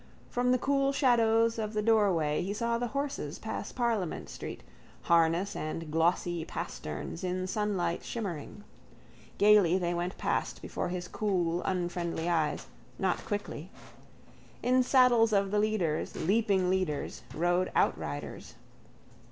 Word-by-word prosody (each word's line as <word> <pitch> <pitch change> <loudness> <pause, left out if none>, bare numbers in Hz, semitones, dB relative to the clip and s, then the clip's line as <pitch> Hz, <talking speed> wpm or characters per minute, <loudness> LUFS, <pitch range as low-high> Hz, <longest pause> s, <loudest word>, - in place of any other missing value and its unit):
From 250 0 +1
the 255 - +4
cool 275 +1 +1
shadow 230 -5 +4
of 225 -2 -1
the 210 - +1
doorway 195 -9 +3
he 195 +3 -2
saw 235 +1 0
the 245 - -1
horses 280 +3 -3
pass - - -5
Parliament 230 -8 -1
street, - - -7 0.4
harness 170 +4 +3
and 155 0 -4
glossy 170 +1 +1
pasterns 75 - -6
in 185 0 -1
sunlight 185 -4 -1
shimmering. 205 -3 -5 0.7
Gaily 205 -4 +5
they 175 -2 -1
went 175 +2 -3
past - - -1
before - - -4
his 180 0 -4
cool 180 -5 0
unfriendly 175 -2 -2
eyes, 160 -3 0 0.3
not 190 -2 0
quickly. 205 -5 -4 0.9
In 255 +1 +4
saddles 245 -3 +4
of 195 -1 +2
the 210 - +2
leaders, 205 -8 0
leaping 195 0 +2
leaders, 185 -6 -1
rode 175 +3 +1
outriders. - - -1
190 Hz, 125 wpm, -30 LUFS, 175-225 Hz, 0.9 s, Gaily